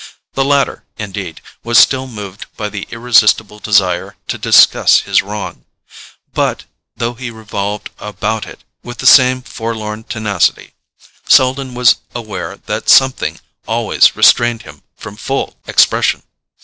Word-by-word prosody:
The 135 - 0
latter, 140 0 0
indeed, 95 -6 -7 0.2
was 120 0 +1
still 130 +1 +4
moved 105 -5 -9
by 105 -1 -4
the 100 -1 -7
irresistible 110 -3 +2
desire 95 -4 0
to - - -3
discuss - - +5
his - - +1
wrong; 105 0 -7 0.7
but, - - -1 0.3
though 120 +1 -3
he 125 0 -7
revolved 105 -2 -5
about 105 +1 -4
it - - -13 0.2
with 120 -1 -10
the - - -7
same 130 -1 +5
forlorn 110 -2 -6
tenacity, 105 -5 -1 0.5
Selden 130 0 +2
was 125 -1 +4 0.2
aware 115 -3 -6
that - - -4
something 135 -1 +3 0.3
always - - +2
restrained 120 -2 +3
him 75 -2 -14 0.2
from 105 -2 -10
full 135 +4 -4
expression. - - +2
110 Hz, 130 wpm, -15 LUFS, 105-125 Hz, 0.7 s, discuss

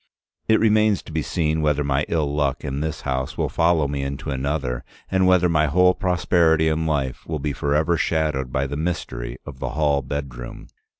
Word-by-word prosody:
It 110 - +4
remains 110 -2 +3
to - - -11
be 80 0 -1
seen 80 0 0
whether 75 -1 +1
my 70 +1 0
ill 75 -4 0
luck 75 -1 0
in 70 -1 -3
this 75 0 -3
house 65 -1 -3
will - - 0
follow 80 -3 +2
me 70 0 -3
into 70 +1 -4
another, 65 -2 -2 0.3
and 95 -1 +3
whether 90 -1 +5
my 80 -2 +2
whole 90 +5 +4
prosperity 85 -3 +2
in 80 +1 0
life 70 -4 -1
will 80 - -2
be 75 0 -2
forever 75 +5 +1
shadowed 75 -7 0
by 65 +1 0
the 70 +1 -4
Mystery 65 -7 -3
of 70 -2 -9
the - - -3
Hall 75 -1 +1
Bedroom. 65 -3 -6
75 Hz, 190 wpm, -23 LUFS, 70-80 Hz, 0.3 s, whether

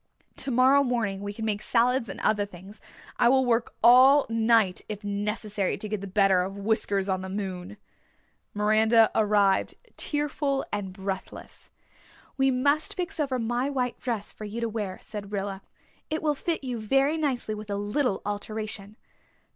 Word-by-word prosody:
Tomorrow 265 +2 +3
morning 225 -7 -1
we 205 0 -4
can 220 +2 -5
make 210 -1 -1
salads 240 0 +1
and - - -7
other 210 -1 +2
things. 200 +2 -12 0.4
I 235 - +4
will 265 0 +4
work 235 -1 0
all 260 +4 +7
night 225 -4 +3
if 210 0 -6
necessary 205 -1 -2
to 215 - -5
get 210 -1 -3
the 200 - -6
better 195 -1 +3
of 195 +2 -4
Whiskers 200 -1 0
on 190 -1 -1
the 190 - -6
moon." 190 0 -5 0.8
Miranda 220 +2 +4
arrived, 205 -2 +2 0.2
tearful 290 -2 -1
and 200 -2 -3
breathless. 190 0 -7 0.7
"We 270 0 +3
must 285 +4 +1
fix 355 -2 -4
over 275 -4 0
my 240 +3 -1
white 250 -3 -2
dress 230 -5 -4
for 215 - -8
you 210 +3 -5
to 230 - -1
wear," 210 -4 -4
said 205 -2 -7
Rilla. 195 -1 -3 0.5
"It 310 +1 -2
will 300 -1 +2
fit 320 +2 -3
you 250 -3 -3
very 270 +7 +2
nicely 265 -8 -1
with 210 0 -8
a 200 - -1
little 205 +3 -1
alteration." 210 0 -5
215 Hz, 165 wpm, -27 LUFS, 200-250 Hz, 0.8 s, all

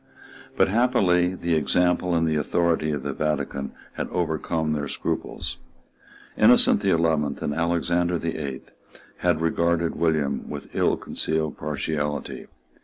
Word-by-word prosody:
But - - +5
happily 95 -6 +2
the 85 -2 -1
example 90 +4 +2
and 80 0 +2
the 80 -1 +1
authority 80 +1 +1
of 75 -1 -2
the - - -3
Vatican 75 -3 -2 0.3
had - - -3
overcome 80 -2 -1
their 75 -1 -2
scruples. - - -4 0.8
Innocent - - +6
the 100 - +1
Eleventh 80 -4 +1
and 75 - -1
Alexander 85 +2 +1
the 80 0 -3
Eighth 70 -4 -6 0.5
had 85 -3 +1
regarded 85 0 +1
William 75 -4 0
with - - -8
ill - - +2
concealed 80 -1 -2
partiality. 75 -1 -3
80 Hz, 130 wpm, -24 LUFS, 75-85 Hz, 0.8 s, Innocent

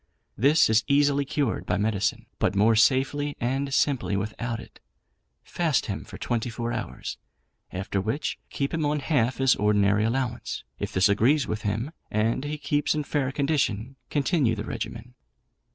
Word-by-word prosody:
This 145 +7 +5
is 110 0 +3
easily 140 0 +3
cured 135 -3 -1
by 90 - +1
medicine, 105 -1 0
but - - +1
more 110 +3 +4
safely 135 +6 +2
and 135 +3 -1
simply 135 -7 +1
without 115 +3 -3
it. - - -13 0.6
Fast 160 -6 0
him 100 - -4
for - - -10
twenty 120 0 -2
four 120 +1 -3
hours; - - -5 0.5
after 95 +1 -2
which, 110 +9 -2
keep 140 +2 -2
him 165 -1 0
on 150 0 +1
half 130 -4 +1
his 135 -1 +4
ordinary 105 0 +3
allowance. 120 +1 -2 0.2
If - - -3
this 95 +1 +4
agrees 120 +9 +3
with 105 - -3
him, 110 +7 -2 0.2
and 110 +5 0
he 150 +1 -3
keeps 145 +1 0
in 150 - -1
fair 140 -2 -1
condition, 135 -5 0
continue 145 -5 +1
the 105 0 -5
regimen. 115 +2 -6
125 Hz, 160 wpm, -26 LUFS, 110-140 Hz, 0.6 s, This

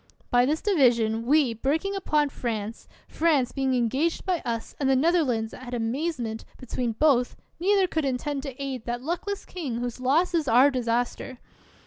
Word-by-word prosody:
By 245 +1 +4
this 305 +3 -1
division, 235 - +2
we, 285 -4 +4
breaking 310 - -1
upon 300 -6 +1
France, 225 -4 -4 0.2
France 300 -7 +1
being 265 -2 0
engaged 265 +8 0
by 365 -3 0
us, 230 -1 -4
and 275 -2 +1
the 265 - +4
Netherlands 260 -7 +1
at 250 -1 -7
amazement 235 -1 -2
be 255 - -11
tween 240 -1 -2
both, 250 -1 +2 0.2
neither 390 +2 +3
could 320 -4 -1
intend 275 +2 -2
to 275 -2 -8
aid 265 -4 -4
that 240 +1 -3
luck 340 +7 -3
less 405 -1 -4
king 300 -10 -5
whose 245 +1 -4
loss 295 +9 +2
is 320 -4 +1
our 255 +5 +6
disaster. 245 +1 -2
265 Hz, 170 wpm, -26 LUFS, 240-315 Hz, 0.2 s, our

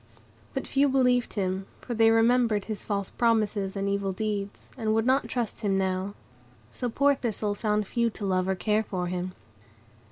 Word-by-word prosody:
But - - -2
few 275 +1 +2
believed 250 -2 +2
him; 190 -1 -2
for 245 - -5
they 225 0 +5
remembered 225 -2 +3
his 215 -2 -5
false 200 -2 -2
promises 215 -4 +1
and 195 0 -1
evil 200 -1 0
deeds, 205 0 -4
and 220 -3 0
would 225 0 +2
not 265 +2 +3
trust 240 -4 -3
him 200 -3 +1
now; 190 +1 -1 0.6
so 245 - -3
poor 280 +4 +3
Thistle 220 -5 -2
found 210 0 0
few 235 +3 +1
to 210 -2 -6
love 185 -1 +1
or 190 - +1
care 210 +3 +1
for 185 -4 -3
him. 180 +1 -3
210 Hz, 180 wpm, -27 LUFS, 195-235 Hz, 0.6 s, they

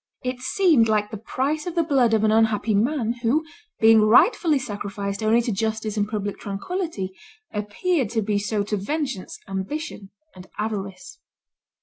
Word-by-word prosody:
It 250 0 -3
seemed 260 - +3
like 210 -1 +1
the 215 - -5
price 285 - -2
of 350 - -4
the 335 - +3
blood 260 -7 +3
of 220 - +1
an 215 - +4
unhappy 220 -1 +2
man, 235 +2 +1
who, 275 +7 +1 0.3
being 225 0 +7
rightfully 290 - +5
sacrificed 200 -4 -4
only 220 +2 +3
to 230 - -1
justice 220 +1 -2
and 205 -1 0
public 205 -2 -3
tranquillity, 205 - -4 0.4
appeared 225 - -1
to 225 -1 -1
be 205 0 0
so 205 0 -1
to 210 +1 -2
vengeance, 265 -1 -3
ambition, 195 +3 -5 0.3
and 185 0 -12
avarice." 210 - -5
220 Hz, 155 wpm, -23 LUFS, 205-270 Hz, 0.4 s, being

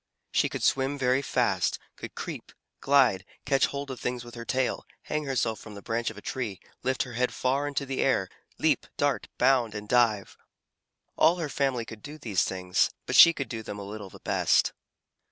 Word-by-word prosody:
She - - +2
could - - -5
swim 135 +1 +2
very 130 0 +2
fast, - - +1 0.2
could - - -9
creep, - - -6 0.3
glide, 130 -9 +4 0.2
catch 135 0 +3
hold 140 -1 -5
of 130 - -7
things 125 -1 -3
with 120 - -11
her 120 - -7
tail, 130 0 0 0.2
hang 150 0 -2
herself 120 -5 0
from 105 -2 -11
the 100 - -9
branch 115 +1 -1
of 110 - -10
a 105 - -10
tree, 110 -8 -3 0.2
lift 130 0 0
her 125 - -9
head 125 +2 0
far 135 +3 0
into 140 -1 -2
the 135 -1 -2
air, 110 -8 +2 0.3
leap, - - +1
dart, - - 0
bound, 125 -4 +3
and 105 0 -6
dive. 115 -4 +2 0.8
All 165 +2 +5
her 165 -4 -3
family 135 -5 0
could 110 -2 -10
do 150 +1 -9
these 110 -11 0
things, 90 -1 +1 0.2
but - - -2
she 170 - +10
could 140 -5 -4
do 115 -2 -5
them 105 -1 -7
a 100 - -6
little 100 0 -7
the - - -14
best. - - +2
125 Hz, 200 wpm, -28 LUFS, 110-135 Hz, 0.8 s, she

